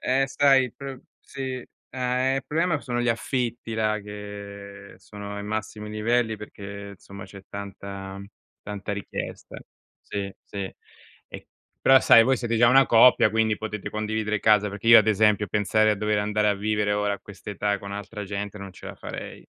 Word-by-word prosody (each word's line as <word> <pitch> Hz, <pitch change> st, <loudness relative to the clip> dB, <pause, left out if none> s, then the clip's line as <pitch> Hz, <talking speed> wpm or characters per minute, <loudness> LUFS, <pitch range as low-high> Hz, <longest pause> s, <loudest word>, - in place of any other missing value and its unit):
Eh 135 Hz, +1 st, +2 dB
sai 135 Hz, -1 st, +4 dB
il 125 Hz, -, -8 dB
pr 135 Hz, -2 st, -8 dB, 0.2 s
sì. 130 Hz, -2 st, -6 dB, 0.3 s
Ah, 125 Hz, -1 st, -1 dB
ehm, 130 Hz, +1 st, +2 dB
il 135 Hz, -, -4 dB
problema 160 Hz, +1 st, 0 dB
sono 120 Hz, -1 st, -2 dB
gli 120 Hz, -, 0 dB
affitti 120 Hz, 0 st, -2 dB
là 110 Hz, -1 st, +1 dB
che 100 Hz, -1 st, -9 dB
sono 100 Hz, -1 st, -8 dB
ai 100 Hz, -, -5 dB
massimi 105 Hz, 0 st, -4 dB
livelli 110 Hz, +1 st, 0 dB
perché, 100 Hz, -1 st, -9 dB
insomma 100 Hz, 0 st, -11 dB
c'è 100 Hz, 0 st, -12 dB
tanta 100 Hz, -1 st, -7 dB, 0.4 s
tanta 105 Hz, 0 st, -5 dB
richiesta. 100 Hz, -1 st, -6 dB, 0.5 s
Sì, 100 Hz, -1 st, -4 dB
sì, 100 Hz, -2 st, -6 dB, 0.5 s
e -, -, -10 dB, 0.3 s
però 135 Hz, 0 st, +6 dB
sai 115 Hz, -, +7 dB
voi 130 Hz, 0 st, +3 dB
siete 115 Hz, -1 st, -1 dB
già 120 Hz, +1 st, +6 dB
una 135 Hz, +2 st, +7 dB
coppia 115 Hz, -1 st, +6 dB
quindi 110 Hz, 0 st, +1 dB
potete 105 Hz, -2 st, -5 dB
condividere 105 Hz, 0 st, -2 dB
casa, 105 Hz, -1 st, +4 dB
perché 105 Hz, +2 st, -8 dB
io 115 Hz, 0 st, +11 dB
ad 110 Hz, -, +3 dB
esempio 105 Hz, -1 st, +3 dB
pensare 110 Hz, +2 st, +2 dB
a 105 Hz, -, +1 dB
dover 105 Hz, +1 st, 0 dB
andare 105 Hz, +1 st, +1 dB
a 105 Hz, -, +3 dB
vivere 105 Hz, 0 st, 0 dB
ora 105 Hz, 0 st, 0 dB
a -, -, -9 dB
quest'età 100 Hz, 0 st, -3 dB
con 100 Hz, 0 st, -8 dB
altra 105 Hz, +1 st, -6 dB
gente 100 Hz, +1 st, -5 dB
non 100 Hz, -1 st, -8 dB
ce -, -, -12 dB
la -, -, -7 dB
farei. -, -, -8 dB
105 Hz, 180 wpm, -25 LUFS, 100-115 Hz, 0.5 s, io